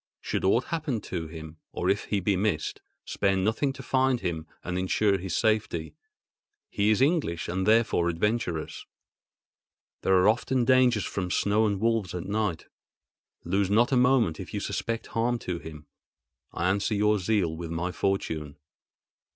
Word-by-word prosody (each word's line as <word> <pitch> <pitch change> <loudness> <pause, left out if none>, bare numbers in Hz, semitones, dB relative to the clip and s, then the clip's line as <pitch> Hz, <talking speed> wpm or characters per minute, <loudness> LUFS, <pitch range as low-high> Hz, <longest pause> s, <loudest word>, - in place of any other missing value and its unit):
Should - - -3
aught 115 +6 +3
happen 150 -6 -2
to 85 -5 -5
him, 80 0 -9
or 90 - -3
if 100 +2 +1
he 105 - 0
be 95 +1 +1
missed, 90 -5 -1 0.2
spare 95 -1 0
nothing 110 +8 +1
to - - -10
find 130 -1 +2
him 80 -3 -3 0.2
and 90 - -4
ensure 100 +1 +1
his 90 -2 -3
safety. 110 -7 0 0.8
He 105 +1 +1
is 110 +4 +4
English 140 - 0
and 95 +2 -2
therefore 110 -6 +3
adventurous. 85 -2 -2 1.1
There 95 - +3
are 90 - +4
often 120 +3 +2
dangers 125 -5 +4
from 95 -2 -3
snow 105 +4 +2
and 100 -2 -1
wolves 110 -5 0
and 90 0 -4
night. 100 -5 -1 0.8
Lose 95 +2 0
not 115 +5 +3
a - - +3
moment 125 -9 +3
if - - -7
you - - -1
suspect 115 0 -3
harm 120 +1 +1
to 90 -6 -4
him. 75 -2 -10 0.7
I 85 - -1
answer 100 +2 0
your 105 0 +2
zeal 90 -4 0
with 85 0 -6
my 85 +2 -2
fortune. 80 -7 -2
100 Hz, 160 wpm, -27 LUFS, 85-115 Hz, 1.1 s, is